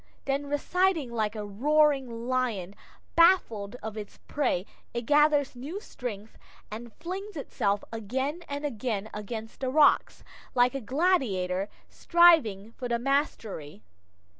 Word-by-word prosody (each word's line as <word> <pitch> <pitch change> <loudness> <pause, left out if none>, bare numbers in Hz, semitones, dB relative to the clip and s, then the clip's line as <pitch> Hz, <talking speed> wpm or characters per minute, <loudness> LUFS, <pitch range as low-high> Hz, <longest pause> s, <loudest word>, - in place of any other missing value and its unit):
Then 275 +1 -1
receding 320 -1 +1
like 215 -2 -1
a 210 -1 -4
roaring 265 +1 +2
lion 235 -8 -1 0.4
baffled 250 - +4
of 220 -1 -5
its 210 -1 -8
prey, 200 -11 0 0.3
it 235 -1 -2
gathers 295 -1 +3
new 290 +11 -6
strength, 225 - -7 0.3
and 230 +2 -7
flings 375 +3 -6
itself 205 -7 -1
again 260 - -2
and 285 +1 -3
again 220 -5 -3
against 220 +2 -6
the 260 - -1
rocks, 295 +2 +3 0.3
like 245 0 +4
a 275 - -3
gladiator 210 - +1 0.2
striving 305 - +4
for 245 +1 -6
the 235 -1 +1
mastery. 230 - -2
250 Hz, 125 wpm, -28 LUFS, 215-295 Hz, 0.4 s, baffled